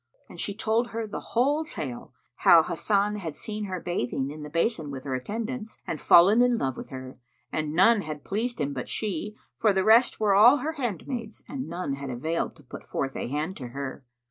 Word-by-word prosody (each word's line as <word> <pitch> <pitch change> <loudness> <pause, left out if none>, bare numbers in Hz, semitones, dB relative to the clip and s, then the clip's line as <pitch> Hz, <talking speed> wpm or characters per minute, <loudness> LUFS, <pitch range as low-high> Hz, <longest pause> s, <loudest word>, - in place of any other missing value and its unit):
And - - -12
she 200 - -3
told 225 +2 +1
her 230 -1 -4
the 210 - -5 0.2
whole 285 +6 +3
tale 135 - -6 0.3
how 165 -2 +7
Hasan 205 +5 0
had 165 -7 -5
seen 215 -1 -5
her 185 -2 -4
bathing 135 -5 -2
in 155 +1 -8
the 150 - -7
basin 165 0 0
with 135 -2 -6
her 135 - -3
attendants, 220 - -4
and 155 - -3
fallen 200 +7 +7
in 245 -1 +4
love 130 - -1
with - - -8
her, 130 -1 -8 0.3
and 155 0 -2
none 210 +4 +5
had 155 -4 -7
pleased 230 +3 -2
him 145 -1 -1
but 130 -2 -5
she, 210 0 -2 0.2
for 215 - +3
the 190 0 +2
rest 230 +4 +5
were 210 -2 +3
all 230 +8 +8
her 295 +3 -2
handmaids, 240 - -4
and 265 -7 -5
none 170 -4 -3
had 140 0 -5
availed 155 +7 -2
to 150 - -18
put 125 - -10
forth 135 0 -3
a - - -3
hand 150 +8 -2
to 125 - -6
her. 135 +2 -6
190 Hz, 210 wpm, -27 LUFS, 145-225 Hz, 0.3 s, all